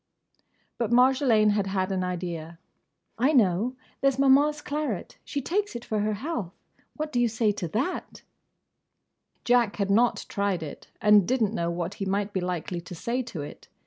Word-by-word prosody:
But 235 - 0
Marjolaine 245 -3 +4
had 205 -1 0
had 190 0 -1
an 185 -1 0
idea. 170 -2 -4 0.6
"I 270 +6 +3
know! 225 - +3 0.3
There 275 - +5
's 270 - -4
Maman's 280 +2 +4
claret. 295 - -4
She 280 - -4
takes 405 0 -1
it 235 - -6
for 215 - -1
her 210 +1 0
health. 220 - -4 0.4
What 305 0 -4
do 245 - 0
you 240 - +4
say 225 -1 +1
to 195 -4 -4
that?" 245 - -3 1.2
Jack 240 -3 +3
had 200 -1 -1
not 235 +4 +3
tried 200 -5 -1
it, 150 - -9 0.2
and 210 -3 +6
did 255 -1 +2
n't 210 0 0
know 170 -5 -1
what 170 +2 -3
he - - 0
might 200 +1 -1
be 190 - -1
likely 180 -1 -3
to 180 +1 -9
say 235 +9 -2
to 200 - -6
it. 145 - -10
215 Hz, 180 wpm, -27 LUFS, 185-255 Hz, 1.2 s, and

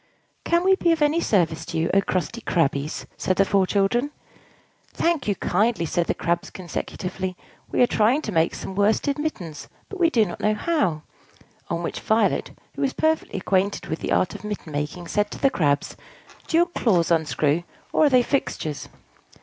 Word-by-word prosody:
"Can 340 +1 +2
we 380 +1 +5
be 345 -2 +2
of 320 -2 +2
any 305 +3 +2
service 165 - +1
to 165 - -3
you, 160 +1 +1
O 195 - +5
crusty 190 +5 -2
Crabbies?" 145 -5 -1
said 185 - 0
the 195 - +3
four 195 -1 +2
children. 215 +8 +1 0.8
"Thank 335 -6 0
you 205 - +1
kindly," 205 0 +1
said 170 +2 0
the - - 0
Crabs 170 0 -1
consecutively. 185 +1 -5 0.3
"We - - +3
are - - +7
trying 240 +6 +2
to 215 - -3
make 165 -2 +2
some 190 - -6
worsted 215 +8 +1
mittens, 180 - -4 0.2
but 395 -3 -7
do 225 -6 +4
not 175 - -7
know 215 0 +1
how." 210 - 0 0.7
On 170 0 -2
which - - -3
Violet, 220 +1 +1 0.2
who - - -6
was 270 -1 +1
perfectly 315 -8 0
acquainted 195 +1 0
with 160 - -4
the - - -4
art 185 - +2
of - - -9
mitten 210 -6 -5
making, 150 +4 -4
said 205 +3 0
to - - -7
the 275 - +2
Crabs, 145 - 0 0.5
"Do 325 - +2
your 345 - +5
claws 200 - +1
unscrew, 155 -1 +2 0.3
or 310 - +4
are - - +5
they 255 -2 +5
fixtures?" 160 - -2
195 Hz, 185 wpm, -24 LUFS, 170-260 Hz, 0.8 s, are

